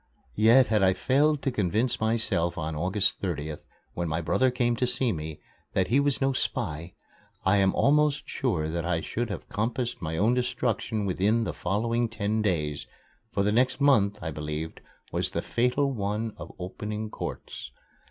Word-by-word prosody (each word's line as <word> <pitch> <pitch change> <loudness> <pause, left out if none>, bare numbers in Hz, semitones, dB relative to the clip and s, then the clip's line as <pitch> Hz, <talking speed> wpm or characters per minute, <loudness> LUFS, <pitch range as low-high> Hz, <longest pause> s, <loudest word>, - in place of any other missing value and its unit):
Yet 115 +5 +5
had 110 -2 +3
I 95 -1 +5
failed 140 +8 +2
to 135 - +1
convince 110 +3 0
myself 110 -6 +1
on 80 -1 -3
August 95 +5 +1
30th, 75 -5 -3 0.3
when 85 -1 -2
my 80 +2 -1
brother 130 +10 +2
came 120 -1 +1
to 125 - +1
see 125 0 +2
me, 80 -3 -5 0.3
that 95 -1 +1
he 130 +5 +4
was 140 -1 +3
no 135 0 +2
spy, 85 - -3 0.5
I 95 +2 +4
am 95 -1 +3
almost 150 0 +3
sure 90 -12 -1
that 85 +1 -2
I 85 -1 0
should 120 +6 -3
have 100 - -6
compassed 120 +3 -2
my 80 -1 -3
own 110 +7 +3
destruction 120 -3 -1
within 100 +5 +2
the - - -3
following 115 +5 0
ten 110 0 -1
days, 75 -8 -1 0.4
for 100 - 0
the 105 - +2
next 125 +4 +2
month, 115 -8 +4
I 80 - -3
believed, 75 +1 -5 0.3
was - - 0
the - - -1
fatal 125 +4 +1
one 105 0 -2
of - - -9
opening 105 +3 -5
courts. - - -6
105 Hz, 170 wpm, -27 LUFS, 90-125 Hz, 0.5 s, Yet